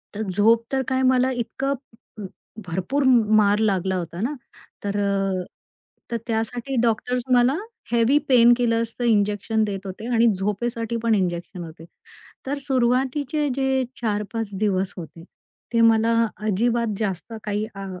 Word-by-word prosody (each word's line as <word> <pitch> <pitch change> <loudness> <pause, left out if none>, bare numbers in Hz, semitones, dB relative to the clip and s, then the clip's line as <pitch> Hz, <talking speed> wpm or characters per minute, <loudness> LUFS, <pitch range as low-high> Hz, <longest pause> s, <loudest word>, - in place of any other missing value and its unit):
तर 210 - -3
झोप 220 +5 +3
तर 270 -1 +1
काय, 260 0 0
मला 260 0 +3
इतकं 260 +3 -2 0.5
अ, - - -5 0.4
भरपूर 190 +12 -1 0.3
मार 205 0 +4
लागला 190 -3 +1
होता 170 0 -5
ना. 250 +7 -1 0.5
तर 205 0 -2
अ, 195 -2 0 0.7
तर 235 - 0
त्यासाठी 235 +3 -2
डॉक्टर्स 240 +2 0
मला 245 +2 +4 0.4
हेवी 235 +4 +4
पेन 240 -2 +7
किलर्सचं 230 0 -1
इंजेक्शन 210 -1 +1
देत 200 -1 -4
होते. 195 +4 -7
आणि 230 +1 +5
झोपेसाठी 225 +4 -2
पण 230 -1 +3
इंजेक्शन 175 -1 -2
होते. 160 0 -11 0.6
तर 280 +2 -2
सुरुवातीचे 265 +3 +1
जे 265 -1 +1 0.2
4-5 215 0 -2
दिवस 195 -3 0
होते, 165 -1 -9 0.5
ते 230 - +3
मला 225 0 +4 0.3
अजिबात 230 +1 +1
जास्त 200 +1 -3
काही 210 0 -2
अ, 195 0 -6
225 Hz, 135 wpm, -23 LUFS, 200-245 Hz, 0.7 s, पेन